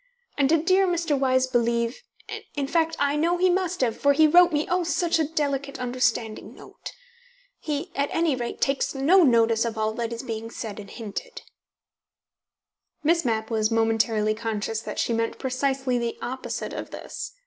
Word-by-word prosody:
And 275 Hz, -2 st, +2 dB
did 325 Hz, 0 st, +2 dB
dear 380 Hz, +1 st, +4 dB
Mr. 340 Hz, -4 st, 0 dB
Wyse 260 Hz, -1 st, +2 dB
believe 235 Hz, -, 0 dB, 0.5 s
in 285 Hz, -2 st, -1 dB
fact, 325 Hz, +2 st, +1 dB
I 285 Hz, 0 st, +1 dB
know 335 Hz, +4 st, +1 dB
he 365 Hz, +1 st, +3 dB
must 365 Hz, -2 st, -1 dB
have, 235 Hz, -3 st, +1 dB
for 285 Hz, 0 st, +3 dB
he 315 Hz, +2 st, +5 dB
wrote 350 Hz, +3 st, +6 dB
me, 300 Hz, 0 st, 0 dB
oh, 360 Hz, 0 st, +1 dB
such 340 Hz, 0 st, +1 dB
a 315 Hz, -, +1 dB
delicate, 285 Hz, -3 st, -2 dB
understanding 240 Hz, -3 st, -1 dB
note. -, -, -11 dB, 0.7 s
He, 300 Hz, +1 st, -4 dB
at 280 Hz, +1 st, 0 dB
any 330 Hz, -4 st, +1 dB
rate, 240 Hz, -1 st, -5 dB
takes 275 Hz, 0 st, 0 dB
no 320 Hz, +8 st, +5 dB
notice 230 Hz, -5 st, +4 dB
of 230 Hz, -1 st, -3 dB
all 220 Hz, 0 st, 0 dB
that 230 Hz, 0 st, -3 dB
is 235 Hz, +2 st, -5 dB
being 225 Hz, -2 st, -5 dB
said 220 Hz, -3 st, -6 dB
and 200 Hz, -1 st, -10 dB
hinted." 360 Hz, -, -7 dB, 1.6 s
Miss 335 Hz, +2 st, +3 dB
Mapp 220 Hz, -2 st, -1 dB
was 215 Hz, -1 st, +1 dB
momentarily 225 Hz, -1 st, +1 dB
conscious 220 Hz, 0 st, -3 dB
that -, -, -7 dB
she 235 Hz, -, 0 dB
meant 230 Hz, 0 st, -1 dB
precisely 265 Hz, -1 st, -1 dB
the 235 Hz, -1 st, -3 dB
opposite 260 Hz, +1 st, -5 dB
of -, -, -6 dB
this. -, -, -7 dB
260 Hz, 175 wpm, -25 LUFS, 230-320 Hz, 1.6 s, wrote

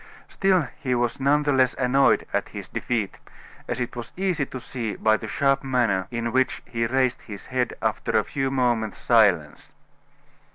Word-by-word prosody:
Still 185 Hz, -7 st, +2 dB
he 125 Hz, -2 st, 0 dB
was 120 Hz, +1 st, -1 dB
none 145 Hz, +2 st, +3 dB
the 145 Hz, -1 st, +1 dB
less 130 Hz, -1 st, +3 dB
annoyed 135 Hz, +2 st, +3 dB
at -, -, -1 dB
his -, -, -8 dB
defeat, 110 Hz, -5 st, -3 dB, 0.5 s
as 120 Hz, -, -3 dB
it 125 Hz, 0 st, -3 dB
was 120 Hz, -1 st, -7 dB
easy 185 Hz, -7 st, 0 dB
to 130 Hz, -, -7 dB
see 120 Hz, -4 st, -5 dB
by 110 Hz, 0 st, +3 dB
the -, -, -5 dB
sharp 135 Hz, 0 st, +1 dB
manner 115 Hz, -8 st, +1 dB
in 115 Hz, -1 st, -3 dB
which 130 Hz, +1 st, +1 dB
he 115 Hz, -1 st, -2 dB
raised 130 Hz, 0 st, +1 dB
his 100 Hz, -3 st, -9 dB
head 125 Hz, -2 st, -1 dB
after -, -, 0 dB
a -, -, +3 dB
few 135 Hz, -1 st, -2 dB
moments' 120 Hz, -5 st, 0 dB
silence. -, -, +2 dB
125 Hz, 175 wpm, -24 LUFS, 115-135 Hz, 0.5 s, none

